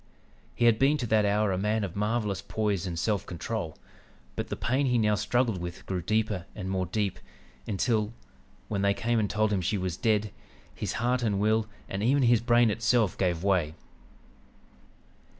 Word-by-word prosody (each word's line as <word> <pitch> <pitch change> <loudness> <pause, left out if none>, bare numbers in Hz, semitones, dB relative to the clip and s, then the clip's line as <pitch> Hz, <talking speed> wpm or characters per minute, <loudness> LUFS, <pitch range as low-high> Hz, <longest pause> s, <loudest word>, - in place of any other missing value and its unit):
He 120 - +1
had 115 -2 +5
been 140 +3 +4
to 125 - -3
that 110 -2 +3
hour 105 0 +2
a 95 - -1
man 105 +2 0
of 95 -4 -4
marvelous 105 -1 -1
poise 105 -4 -1
and 85 -2 -4
self 100 +2 0
control, 90 -1 -4 0.6
but - - -3
the - - -3
pain 135 +3 0
he 125 -1 +2
now 105 -2 +3
struggled 115 -1 0
with 85 0 -7
grew 95 -2 -2
deeper 105 -3 -1
and 95 -3 -4
more 95 -1 -1
deep, 100 +1 -2 0.5
until, 110 +1 0 0.6
when 100 -2 -2
they 100 0 +2
came 115 0 0
and 105 -2 0
told 110 0 +1
him 95 - +1
she 100 +4 0
was 90 -3 -3
dead, 110 -2 +1 0.4
his - - -4
heart 125 +2 0
and 105 -4 0
will, 110 +1 +2 0.2
and 95 - -4
even 135 +5 +3
his 120 -2 +4
brain 120 -1 +4
itself 115 -1 +2
gave 90 -3 0
way. 90 -6 +1
105 Hz, 185 wpm, -28 LUFS, 95-115 Hz, 0.6 s, had